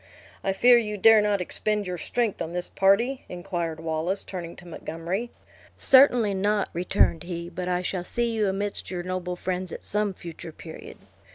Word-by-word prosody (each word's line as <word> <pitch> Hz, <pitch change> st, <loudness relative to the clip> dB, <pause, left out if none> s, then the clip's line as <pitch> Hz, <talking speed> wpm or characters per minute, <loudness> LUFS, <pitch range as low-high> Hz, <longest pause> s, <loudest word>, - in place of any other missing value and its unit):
"I 195 Hz, -, +1 dB
fear 240 Hz, +5 st, +6 dB
you 210 Hz, -2 st, -3 dB
dare 220 Hz, +1 st, +7 dB
not 205 Hz, -2 st, +1 dB
expend 210 Hz, +3 st, -1 dB
your 180 Hz, -1 st, -4 dB
strength 230 Hz, +2 st, -1 dB
on 165 Hz, 0 st, -4 dB
this 180 Hz, 0 st, -2 dB
party?" 230 Hz, +8 st, +2 dB
inquired 175 Hz, -3 st, -4 dB
Wallace, 165 Hz, +4 st, -2 dB
turning 170 Hz, -3 st, -7 dB
to 175 Hz, -, -13 dB
Montgomery. 170 Hz, +7 st, -4 dB, 0.5 s
"Certainly 250 Hz, -6 st, +6 dB
not," 205 Hz, +1 st, +1 dB
returned 170 Hz, -2 st, +2 dB
he; 170 Hz, -1 st, -5 dB
"but 180 Hz, +1 st, -4 dB
I 180 Hz, 0 st, 0 dB
shall 180 Hz, -1 st, -2 dB
see 235 Hz, +5 st, 0 dB
you 215 Hz, -3 st, +1 dB
amidst 200 Hz, +1 st, -3 dB
your 180 Hz, -2 st, -4 dB
noble 180 Hz, 0 st, -3 dB
friends, 180 Hz, 0 st, -3 dB
at -, -, -7 dB
some 210 Hz, -2 st, 0 dB
future 170 Hz, -1 st, -9 dB
period. 160 Hz, 0 st, -10 dB
185 Hz, 175 wpm, -26 LUFS, 175-210 Hz, 0.5 s, dare